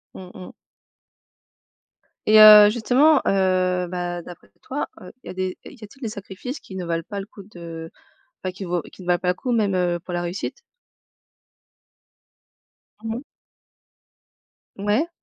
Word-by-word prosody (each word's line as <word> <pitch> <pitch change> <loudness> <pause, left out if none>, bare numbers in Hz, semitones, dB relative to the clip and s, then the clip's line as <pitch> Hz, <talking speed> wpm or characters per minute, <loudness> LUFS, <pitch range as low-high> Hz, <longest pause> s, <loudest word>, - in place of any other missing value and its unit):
Mmh 185 -1 -10
mh 185 - -10 1.7
et 215 0 +6
heu, 210 -1 +10
justement, 255 +7 +3
heu, 185 -2 +1
bah 175 0 -4
d'après 175 0 -13
toi, 280 +3 -3
heu, 180 - -11
il - - -13
y - - -6
a - - -6
des 185 0 -3
il 265 - -12
y - - -13
a - - -8
t'il 270 +6 -20
des 230 - -3
sacrifices 205 +6 -7
qui 190 - -12
ne 185 -2 -4
valent 165 0 -2
pas 200 - -5
le 195 - -6
coup 205 -1 -14
de 170 -4 -9 0.5
enfin 185 - -2
qui 190 +1 -8
vaut 175 -1 -1
qui - - -14
ne - - -12
valent 175 -1 +2
pas 180 - -1
le - - +3
coup 245 +7 -4
même, 210 -4 +1
heu, 175 -1 0
pour 175 +1 -8
la 175 - -1
réussite? 175 - -4 2.5
Mmh 225 0 -3
mh. 245 - -5 1.5
Ouais. 205 +10 0
190 Hz, 175 wpm, -23 LUFS, 180-215 Hz, 2.5 s, heu